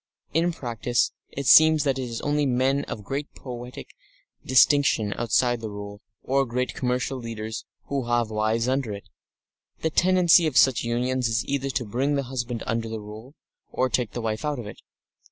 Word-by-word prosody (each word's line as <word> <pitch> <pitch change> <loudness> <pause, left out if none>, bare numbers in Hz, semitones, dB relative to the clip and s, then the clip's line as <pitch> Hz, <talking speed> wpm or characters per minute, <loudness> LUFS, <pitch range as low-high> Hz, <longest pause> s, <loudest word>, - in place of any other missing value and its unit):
In 170 +3 +2
practice, 120 -5 -1 0.2
it 140 - -6
seems 155 +2 +7
that 135 -2 0
it 125 -2 -4
is 115 - -5
only 145 0 0
men 135 +2 +1
of 105 - -7
great 140 +7 -4
poietic 125 -1 -8 0.5
distinction 130 -5 +4
outside 120 +1 +1
the 110 - -5
Rule, 100 0 -8 0.2
or 135 +1 +2
great 125 +2 -2
commercial 125 +1 -2
leaders, 110 -2 -6 0.2
who 140 -3 -3
have 120 -2 +1
wives 110 +2 0
under 130 -4 -1
it. 100 - -9 0.7
The 160 - 0
tendency 175 -1 +5
of 145 - -1
such 130 -3 +5
unions 125 +2 0
is 115 +1 0
either 135 0 -2
to 130 -2 -2
bring 130 +7 0
the 140 - 0
husband 125 -2 -4
under 115 0 -2
the 110 0 -4
Rule, 110 +7 -11 0.4
or 130 - 0
take 120 -3 -1
the 120 - -4
wife 110 -1 -3
out 150 -1 -1
of 120 - -6
it. 105 - -10
125 Hz, 180 wpm, -25 LUFS, 115-140 Hz, 0.7 s, seems